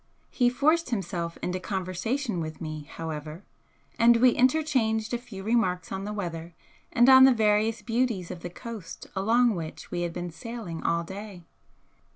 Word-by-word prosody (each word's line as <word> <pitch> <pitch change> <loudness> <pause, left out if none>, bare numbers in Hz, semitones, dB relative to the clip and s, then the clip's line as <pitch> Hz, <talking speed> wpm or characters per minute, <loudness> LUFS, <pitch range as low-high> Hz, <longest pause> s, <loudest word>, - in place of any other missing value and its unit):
He 245 -2 +3
forced 310 +5 +2
himself 175 -6 -3
into 180 +1 -1
conversation 190 +5 -2
with 155 -1 -5
me, 155 -3 -6
however, 155 +2 -6 0.6
and 235 0 +6
we 250 +1 +6
interchanged 250 -5 +1
a 240 - 0
few 200 -6 -10
remarks 205 -5 0
on 190 +1 -4
the 210 - -4
weather 170 -5 -5 0.4
and 240 +1 +4
on 260 0 +9
the 265 - +8
various 215 0 +2
beauties 230 -7 -1
of 180 - -7
the 175 - -6
coast 210 -1 -8
along 230 +4 +3
which 165 -4 -7
we 175 - -2
had 175 -1 -1
been 175 0 -5
sailing 215 -3 -7
all 170 0 0
day. 190 0 -9
205 Hz, 165 wpm, -27 LUFS, 175-235 Hz, 0.6 s, on